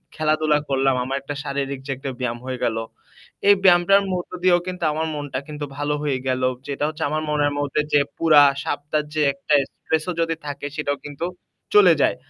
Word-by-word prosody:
খেলাধুলা 155 -1 +2
করলাম। 135 -1 +2
আমার 135 +2 -3
একটা 145 +1 -6
শারীরিক 140 -1 -3
যে - - -2
একটা 135 +1 -5
ব্যায়াম 120 -2 -2
হয়ে 130 -1 -3
গেল। 115 -1 0 0.7
এই 205 - +8
ব্যায়ামটার 190 +2 +5
মধ্য 180 -1 -4
দিয়েও 180 -1 +5
কিন্তু 180 -2 -5
আমার 160 +2 -2
মনটা 145 -3 -4
কিন্তু 150 -1 -5
ভালো 145 0 -1
হয়ে 140 -3 0
গেলো। 130 0 +1 0.2
যেটা 140 0 -3
হচ্ছে 155 +1 -5
আমার 155 +1 -1
মনের 145 -1 +1
মধ্যে 145 +1 0
যে 145 - +6 0.2
পুরা 155 -3 +6 0.2
সপ্তাহের 150 +1 -2
যে 155 - +1
একটা 140 +2 -3 0.2
স্ট্রেস 160 -1 -1
ও - - +1
যদি 165 0 0
থাকে 145 0 -5
সেটাও 145 -2 -1
কিন্তু 145 +3 -5 0.5
চলে 190 -5 +8
যায়। - - +3
145 Hz, 190 wpm, -22 LUFS, 140-160 Hz, 0.7 s, এই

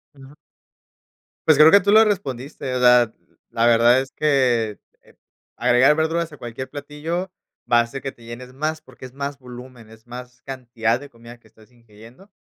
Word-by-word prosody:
Ujú. 135 +1 -15 1.1
Pues 155 -3 +5
creo 155 +2 +8
que 200 - +8
tú 200 +1 0
lo 220 +1 +7
respondiste. 140 - -4
O - - -1
sea, 125 -2 +5 0.4
la 115 - 0
verdad 120 +1 +5
es 135 - -9
que, 125 -8 +1 0.2
eh, - - -24 0.4
agregar 130 +5 +4
verduras 160 +1 -1
a 150 - -12
cualquier 120 +2 -7
platillo 150 +6 -5 0.4
va 120 - +6
a 115 - -4
ser 135 +3 -8
que 135 - -5
te 120 - -20
llenes 125 +2 -10
más 155 +3 -3
porque 130 -4 -14
es 125 - -12
más 140 0 -5
volumen, 125 -2 -12
es 110 0 -18
más 125 +1 -11
cantidad 120 -3 -2
de 145 +1 -12
comida 120 -1 -15
que 115 - -24
estás 110 +2 -23
ingiriendo, 115 - -18
130 Hz, 185 wpm, -21 LUFS, 120-150 Hz, 1.1 s, creo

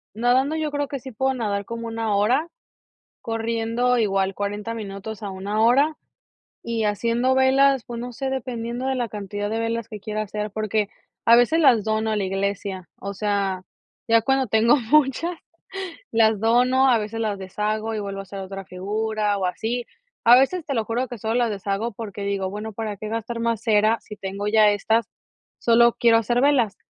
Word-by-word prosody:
Nadando 255 +6 +2
yo 310 -1 -2
creo 290 0 -1
que 275 -1 -5
sí 260 +2 -9
puedo 265 +4 0
nadar 205 -4 -2
como 230 +1 -6
1 225 -2 -1
hora, 245 +10 +2 0.7
corriendo 230 +2 0
igual 195 -3 +1
40 205 +2 -3
minutos 215 0 -7
a 205 - -3
1 200 +3 -2
hora. 275 +7 +4 0.7
Y 230 -1 -2
haciendo 230 +5 +1
velas, 265 0 +4
pues, 240 -1 -6
no 245 +1 -6
sé, 265 +3 -3
dependiendo 245 -1 -4
de 265 - +1
la 240 -3 -2
cantidad 205 0 -4
de 220 - -2
velas 230 -1 -2
que 215 - -7
quiera 215 +1 -3
hacer 210 0 -4
porque, 215 -1 -1 0.4
a 235 0 +8
veces 245 +8 +4
las 250 -8 +5
dono 220 +1 0
a - - 0
la 205 - 0
iglesia, 195 -1 -3
o 200 0 -5
sea, 200 -2 -1 0.4
ya 230 0 +5
cuando 270 +2 +1
tengo 225 +4 +4 0.2
muchas 305 +4 +3 0.7
las 220 -2 +3
dono, 250 +4 +3
a 240 -3 +4
veces 215 +2 -5
las 210 -3 -2
deshago 215 +3 -2
y - - -2
vuelvo 200 -1 -5
a - - -9
hacer 195 0 -8
otra 195 0 -7
figura 210 +3 -1
o 190 - 0
así. 230 +6 -2 0.4
A 235 +1 +9
veces 315 +7 +2
te 280 - -2
lo 225 -2 0
juro 240 +4 -1
que 245 - -7
solo 220 +2 -1
las 240 -1 +2
deshago 200 +3 -2
porque 205 -2 -7
digo: 200 -1 -1
"Bueno, 210 +2 -6
¿para 215 0 -4
qué 215 - -6
gastar 230 +1 -4
más 230 -2 -1
cera 215 0 +3
si 210 - -10
tengo 195 +1 -4
ya 215 0 +5
estas? 220 +3 +1 0.5
Solo 235 0 +4
quiero 230 -1 +5
hacer 240 +2 +1
velas". 260 -7 +2
225 Hz, 190 wpm, -23 LUFS, 205-240 Hz, 0.7 s, A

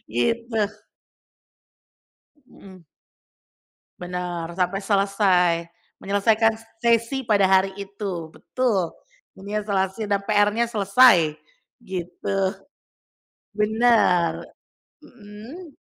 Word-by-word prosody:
Gitu. 230 - -1 1.9
Mhm. 185 -3 -16 1.2
Benar, 175 -2 -5
sampai 185 +2 0
selesai, 195 -3 +2 0.5
menyelesaikan 215 +3 +2 0.3
sesi 235 +3 +1
pada 205 -5 +3
hari 190 0 +3
itu, 195 -4 -5
betul. 215 -10 -1 0.5
Menyeselasi 205 0 -2
dan 200 - +2
PR-nya 210 +2 +2
selesai, 200 -7 +4 0.4
gitu. 190 +2 -3 0.9
Bener. 210 -4 +2 0.5
Mhm. 255 - -13
200 Hz, 70 wpm, -23 LUFS, 185-225 Hz, 1.9 s, selesai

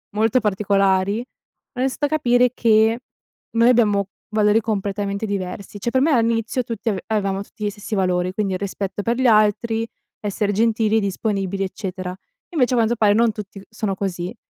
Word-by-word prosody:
molto 220 +3 +3
particolari, 200 -1 +1 0.6
ho - - -6
iniziato 265 +2 0
a - - +2
capire 250 -5 +3
che 225 +1 +3 0.5
noi 230 +1 +4
abbiamo 210 -5 +3 0.2
valori 215 0 +3
completamente 200 -1 -2
diversi. 200 0 -5
Cioè 235 +4 -2
per 260 - +2
me 300 - +3
a 250 - +4
inizio 230 +2 0
tutti 230 0 -3
av 200 - -1
avevamo 200 -3 -1
tutti 210 +1 -8
gli - - +1
stessi 205 +2 -8
valori, 180 -2 +1
quindi 200 -1 -1
il 185 - -2
rispetto 200 0 -4
per 235 +2 0
gli 260 0 +2
altri, 225 +1 +2 0.3
essere 205 0 -1
gentili, 220 0 +2
disponibili, 195 -1 -2
eccetera. 185 -1 -5 0.3
Invece 260 -7 +1
a - - +2
quanto 230 0 +2
pare 215 -3 +4
non 230 +1 +3
tutti 205 -2 -9
sono 215 -2 -2
così 185 +1 -4
210 Hz, 175 wpm, -21 LUFS, 195-230 Hz, 0.6 s, noi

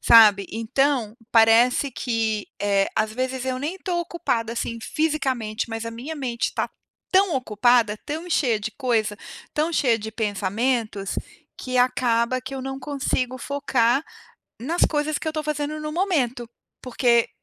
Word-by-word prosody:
sabe. 210 -4 +7
Então, 230 0 0 0.2
parece 235 +4 +5
que, 225 -4 -1
eh, 200 -1 +2
às 215 0 +1
vezes, 255 +1 -2
eu 255 0 -1
nem 310 +7 -3
estou 360 -2 -2
ocupada, 285 -10 -2
assim, 230 0 -3
fisicamente 260 -9 -1
mas 225 0 -4
a 230 - -4
minha 250 +8 -6
mente 245 -4 -2
tá - - -1 0.4
tão 380 -4 +4
ocupada, 230 -2 +2
tão 320 +4 -5
cheia 245 -10 +2
de 215 +1 -3
coisa, 225 -6 0 0.4
tão 315 +3 0
cheia 240 -7 +3
de 220 +1 -6
pensamentos, 215 0 -1 0.4
que 255 -1 -2
acaba 245 0 +2
que 265 +1 -7
eu 265 - -4
não 270 +1 -5
consigo 260 -3 -2
focar 270 -1 +1 0.6
nas 325 +8 -1
coisas 295 0 0
que 315 - -3
eu - - 0
estou 310 -1 -3
fazendo 300 0 -2
no 305 0 -4
momento. 275 -10 0 0.3
Porque, 240 -2 +2
250 Hz, 150 wpm, -24 LUFS, 225-285 Hz, 0.6 s, sabe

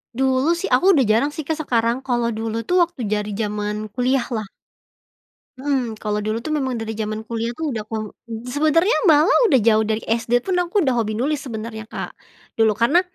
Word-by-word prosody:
Dulu 265 +5 +2
sih 340 - -4
aku 360 +9 +5
udah 270 - +4
jarang 230 +6 +2
sih, 310 - -4
Kak, 315 +2 -3
sekarang 235 -2 +1
kalau 240 -3 -1
dulu 225 +1 -3
tuh 360 +10 +2
waktu 345 -7 -11
dari 210 0 -1
zaman 210 0 -3
kuliah 250 +2 +1
lah. 220 -4 -3 1.1
Mmm, 260 -5 -1
kalau 210 -1 -2
dulu 215 +2 -1
tuh 310 - -1
memang 265 -5 -1
dari 225 0 -4
zaman 215 0 -4
kuliah 230 0 -3
tuh 310 -5 -2
udah 220 - -3
aku 215 0 -5 0.3
sebenernya 310 - +2 0.2
malah 305 +3 +5 0.2
udah 270 - +5
jauh 220 -1 +4
dari 220 +1 -2
SD 235 +1 0
pun 380 - -1
aku 355 -1 0
udah 260 - +2
hobi 215 -3 -1
nulis 285 +4 0
sebenernya, 220 -3 -6
Kak, - - -6 0.4
dulu 220 -2 +2
karena 275 +11 +4
235 Hz, 190 wpm, -21 LUFS, 220-280 Hz, 1.1 s, aku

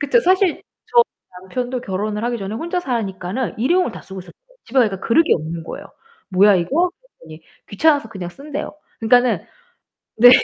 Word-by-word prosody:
그쵸, 390 - +3
사실 370 -2 +2 0.2
저희 475 -1 +5 0.4
남편도 245 +6 -3
결혼을 210 +3 -3
하기 240 -1 -1
전에 195 +1 -5
혼자 340 +9 -2
사니까는 230 - -3
일회용을 270 +2 +2
다 - - -10
쓰고 190 -1 -9
있었어요. 180 - -13 0.3
집에 260 +3 -1
가니까 205 -6 +2
그릇이 320 +8 +3
없는 165 +1 -4
거예요. - - -8 0.4
"뭐야 195 +1 +5
이거?" 300 - +1 0.3
그랬더니 160 0 -13 0.3
귀찮아서 285 +3 +2
그냥 180 -4 -6
쓴대요. 285 +6 -6 0.3
그러니까는 245 +2 +3 0.7
네, 245 +2 +9
235 Hz, 395 characters per minute, -20 LUFS, 195-285 Hz, 0.7 s, 네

